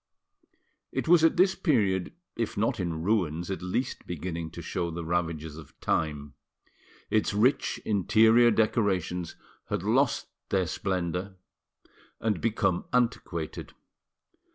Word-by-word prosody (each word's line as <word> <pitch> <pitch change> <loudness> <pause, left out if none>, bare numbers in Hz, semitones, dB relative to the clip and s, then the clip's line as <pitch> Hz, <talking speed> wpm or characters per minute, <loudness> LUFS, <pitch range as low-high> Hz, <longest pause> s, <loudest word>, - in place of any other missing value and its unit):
It - - -2
was 170 -1 +6
at 165 - +4
this 190 +2 +5
period 100 - +1 0.2
if 115 -2 -3
not 110 +1 0
in 85 -3 -2
ruins 90 -4 0
at 95 - -4
least 90 +8 -3
beginning 85 -1 -4
to 85 - -7
show 85 -2 -2
the 85 0 -5
ravages 80 -2 -2
of 80 - -13
time. 75 -2 -1 0.8
Its 105 -1 +1
rich 120 +7 +2
interior 110 +3 +5
decorations 100 -6 0 0.3
had - - -2
lost - - +2 0.2
their 95 -2 +2
splendour 90 +2 -2 0.8
and 105 -5 -1
become 100 -5 0
antiquated. 105 -10 -1
95 Hz, 120 wpm, -28 LUFS, 85-110 Hz, 0.8 s, was